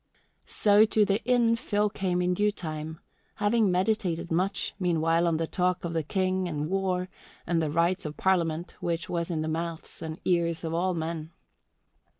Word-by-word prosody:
So 205 0 +5
to 215 -1 +3
the 200 +2 0
inn 240 -2 +4
Phil 210 -3 0
came 185 -3 -1
in 180 0 +2
due 210 +3 +2
time, 160 -3 -6 0.4
having 210 0 +2
meditated 180 -3 0
much, 185 +4 0
meanwhile, 165 -1 +2
on 165 -2 +2
the 165 - 0
talk 180 +1 0
of 170 - -3
the 165 - +1
King 185 +3 0
and 150 0 -3
war 185 -2 0 0.4
and 165 -1 +1
the 155 - 0
rights 170 +5 +1
of 150 0 -6
Parliament, 170 -3 0
which 170 -1 -2
was 170 0 -2
in 160 -2 -1
the - - -3
mouths 165 +1 -4
and 160 0 -5
ears 170 -2 +1
of 165 0 -3
all 180 +2 +1
men. 160 -1 -4
175 Hz, 175 wpm, -28 LUFS, 165-190 Hz, 0.4 s, So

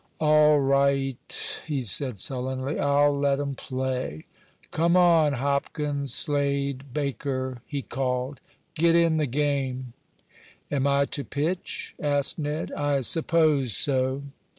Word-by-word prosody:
"All 150 -1 +5
right," 135 -1 0
he 145 -4 -1
said, 120 +1 +1
sullenly. 130 +4 -2
"I'll 145 0 +3
let 140 0 +1
'em 140 -1 -2
play. 130 - -4 0.5
Come 170 +3 +2
on, 165 -4 +5
Hopkins 140 +1 -2
Slade 140 -1 0
Baker!" 130 -2 -3
he 140 -2 -4
called. 130 +1 -2 0.3
"Get 165 +1 +3
in 165 -1 +3
the 155 -2 +1
game." 130 -2 -2 0.8
"Am 140 -1 +1
I 140 0 +3
to 140 - -4
pitch?" 160 +7 -3
asked 145 +1 0
Ned. 150 +2 -3
"I 145 -1 0
suppose 155 -3 +2
so." 130 0 0
140 Hz, 120 wpm, -26 LUFS, 130-150 Hz, 0.8 s, All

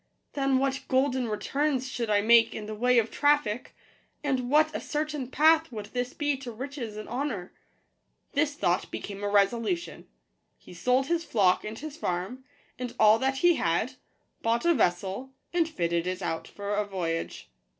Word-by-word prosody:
Then 275 -2 +2
what 270 0 0
golden 260 -1 +1
returns 265 +5 -1
should 240 -3 -3
I 205 -1 +3
make 230 +2 +5
in 215 - -5
the 215 - -5
way 250 +3 +2
of 225 -1 +2
traffic; 290 -6 +1 0.5
and 260 -4 -1
what 305 +2 +3
a - - -2
certain 300 -3 -3
path 315 +2 +4
would 210 -2 -7
this 250 0 -2
be 290 -1 0
to 255 -2 -7
riches 245 -2 -6
and 215 - -7
honour!" 240 -8 -3 0.8
This 290 0 +1
thought 175 -9 0
became 200 0 -6
a 205 - 0
resolution: 230 - 0 0.5
he - - -14
sold 250 +9 +1
his 335 +2 0
flock 195 - +2
and 215 +1 -6
his 305 +2 -7
farm, 190 - -3 0.4
and 250 -1 -5
all 215 +1 +6
that 265 +1 0
he 345 -2 +6
had, 175 +10 0 0.5
bought 230 +4 +1
a 340 - +5
vessel, 195 - -1 0.2
and 335 -2 +2
fitted 170 - -1
it 185 +1 -3
out 165 - -3
for 205 0 -5
a 210 +1 +1
voyage. 175 -5 -4
245 Hz, 170 wpm, -28 LUFS, 205-280 Hz, 0.8 s, all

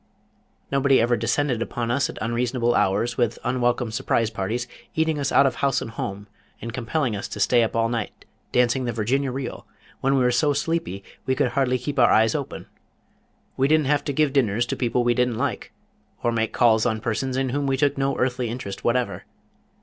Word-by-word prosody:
Nobody 135 -1 +4
ever 120 +1 +3
descended 120 +2 0
upon 115 0 -2
us 140 +3 +1
at - - -8
unreasonable 120 +1 0
hours 105 +6 +1
with 120 -1 +1
unwelcome 120 -2 0
Surprise 115 0 0
Parties 115 +4 -3 0.3
eating 160 -1 +1
us 140 -1 -1
out 140 - +5
of 130 -3 0
house 140 -2 +1
and 115 - -6
home 100 -2 -5 0.3
and 115 0 -6
compelling 125 0 -1
us 100 - -4
to - - -7
stay 120 -2 +4
up 115 - -1
all 115 0 +2
night 115 -2 -4 0.3
dancing 125 +1 +2
the 120 - -2
Virginia 130 +5 0
Reel 135 +1 -6 0.3
when 135 +1 +1
we 130 - +3
were 125 - +3
so 145 +5 +2
sleepy 150 - -2 0.2
we 130 - +2
could 135 -2 +1
hardly 130 -1 +1
keep 140 +3 -4
our 120 - +6
eyes 110 0 +4
open. - - -4 0.9
We 135 - +2
didn't 155 0 +3
have 145 +1 +1
to - - -1
give 145 0 +1
dinners 120 -4 +2
to - - -3
people 120 0 0
we 120 0 +3
didn't 125 -2 0
like, - - -3 0.5
or 120 - +2
make 110 -1 0
calls 110 -3 +4
on 110 -2 0
persons 125 +4 -2
in 135 -1 0
whom 140 +2 -1
we 135 0 +1
took 145 +1 +2
no 135 0 0
earthly 125 -2 0
interest 115 -5 -6
whatever. 125 +1 0
125 Hz, 205 wpm, -24 LUFS, 115-135 Hz, 0.9 s, our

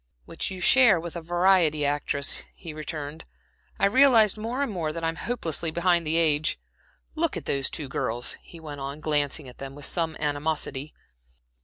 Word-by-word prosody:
"Which - - -4
you 190 - -7
share 240 -5 +6
with 170 +1 -7
a 170 - -4
variety 175 -3 +3
actress," 145 0 +1
he 165 - -8
returned. 150 0 -6 0.5
"I 195 - +3
realize 225 -2 +5
more 230 +6 -2
and 275 - -2
more 165 -5 -2
that 165 +1 -6
I'm 165 0 0
hopelessly 170 -8 -2
behind 170 0 +1
the 160 +2 +1
age. 155 -2 +2 0.5
Look 320 - +1
at 160 - -7
those 135 -1 -1
two 150 - -6
girls," 120 -2 -2
he 170 - -13
went 145 -3 -8
on, 140 +2 -5
glancing 150 -2 0
at 125 - -13
them 135 0 -7
with 145 - -7
some 165 -2 -1
animosity. 145 -1 -2
160 Hz, 175 wpm, -26 LUFS, 145-180 Hz, 0.5 s, share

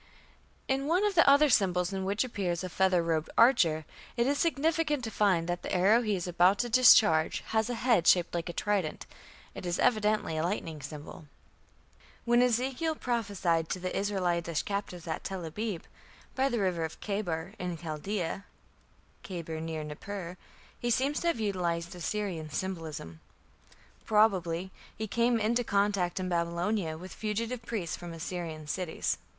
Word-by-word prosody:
In 270 +1 0
one 360 +6 +2
of 415 - +1
the 335 -5 +6
other 285 +2 +6
symbols 180 -6 +2
in 190 -1 -2
which 200 +4 +1
appears 190 -8 -2
a 185 - -4
feather 185 -1 +2
robed 165 -2 -1
archer, 165 - +4 0.3
it 235 - +3
is 280 +2 +1
significant 315 -3 +1
to 225 - -4
find 190 -5 +2
that 175 0 -2
the - - -5
arrow 200 +6 +4
he 215 -4 0
is 180 - -3
about 180 +2 +4
to 240 +3 -1
discharge 220 -9 +6
has 220 +1 +1
a 245 - -1
head 230 -7 +2
shaped 175 -1 +4
like 170 0 -2
a - - -4
trident; 195 -7 -1 0.5
it - - -8
is 175 -1 -1
evidently 215 -7 +1
a 155 - 0
lightning 165 -4 -3
symbol. 150 +2 -9 1.0
When 240 0 +4
Ezekiel 260 +6 +1
prophesied 200 - -1
to 185 - -2
the 185 0 -4
Israelitish 175 -5 0
captives 200 -4 -4
at 160 -2 -4
Tel 190 -3 -4
abib, 195 +2 -4 0.5
"by 270 +1 +1
the 240 - -1
river 180 -4 0
of 160 - -5
Chebar" 190 -3 -3
in 180 -2 -3
Chaldea 170 +4 -4 0.8
(Kheber, 165 -4 -5
near 160 -1 -4
Nippur), 175 +4 -6 0.4
he 240 - -3
appears 270 +5 +1
to 345 - -2
have 335 -9 +1
utilized 175 -5 -1
Assyrian 175 -2 -3
symbolism. 155 - -5 0.9
Probably 190 -5 +2 0.3
he 220 - -2
came 235 +2 +1
into 235 +3 +1
contact 200 -4 +1
in 185 - -2
Babylonia 170 0 -1
with 185 +3 -9
fugitive 225 +3 -3
priests 215 -8 -3
from 175 -1 -8
Assyrian 165 -2 -5
cities. 170 +2 -2
190 Hz, 160 wpm, -30 LUFS, 170-225 Hz, 1.0 s, the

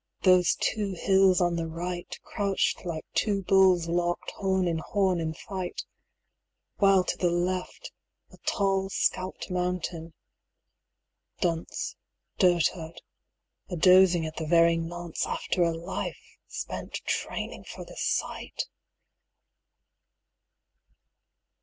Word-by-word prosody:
those 180 -2 +5
two 205 -3 -1
hills 190 +1 +4
on 175 -1 +2
the 165 -1 -2
right, 175 +2 -5
Crouched 200 -2 -1
like 165 -3 -4
two 200 -3 +1
bulls 185 -3 +4
locked 175 +1 -1
horn 190 -2 0
in 165 -1 0
horn 190 +1 +1
in 160 -1 -1
fight; 185 -1 -5 0.9
While 195 -2 +5
to - - -2
the 175 - +2
left, 180 +1 -2 0.4
a - - -16
tall 195 -1 0
scalped 185 0 -1
mountain... 180 -2 -2 1.3
Dunce, 170 -3 -2 0.4
Dotard, 170 -2 +1 0.7
a 180 - -3
dozing 180 -1 +6
at 155 0 -6
the 160 - -3
very 170 0 +5
nonce, 170 0 -3
After 180 - -1
a 170 -1 +4
life 170 +3 -6
spent - - -6
training - - -3
for - - -8
the - - -12
sight! - - -2
180 Hz, 110 wpm, -28 LUFS, 170-190 Hz, 1.3 s, dozing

